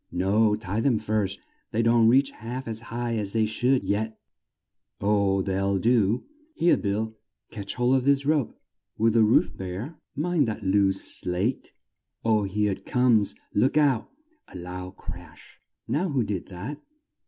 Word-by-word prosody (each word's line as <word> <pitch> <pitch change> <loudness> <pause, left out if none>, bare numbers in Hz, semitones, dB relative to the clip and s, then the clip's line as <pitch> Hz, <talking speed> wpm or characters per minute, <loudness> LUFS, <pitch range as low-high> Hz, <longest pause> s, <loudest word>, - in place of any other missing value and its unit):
No, 105 +4 +2
tie 105 0 -3
'em 120 -1 +2
first 105 -2 -1 0.3
they 115 +1 +1
don't 115 0 +4
reach 135 +4 +4
half 125 +3 -7
as 110 -1 -3
high 120 0 -2
as 100 -2 -3
they 110 -1 +2
should 125 +4 +1
yet 110 +2 -1 0.8
oh, 100 -2 +2
they'll 95 0 0
do. 115 +1 +2 0.3
Here, 170 - +4
Bill! 110 +2 -2 0.4
catch 100 -3 -5
hold 125 +2 +3
of 130 - -1
this 140 0 +2
rope 150 -4 0 0.4
Will 115 +1 +3
the 115 +1 +4
roof 105 -4 +3
bear? 100 - -6 0.2
Mind 160 -3 +1
that 110 -1 -4
loose 95 0 +2 0.2
slate 95 +8 -2 0.5
oh, 110 -2 +3
here 105 +1 0
it 95 0 -6
comes! 115 - +2 0.2
Look 130 +8 +2
out. 140 -6 +2 0.4
(A - - -10
loud 90 +1 -7
crash.) 90 -3 -11 0.3
Now 175 +6 0
who 135 -5 +1
did 100 -4 -4
that? 110 +12 -7
110 Hz, 155 wpm, -26 LUFS, 100-125 Hz, 0.8 s, don't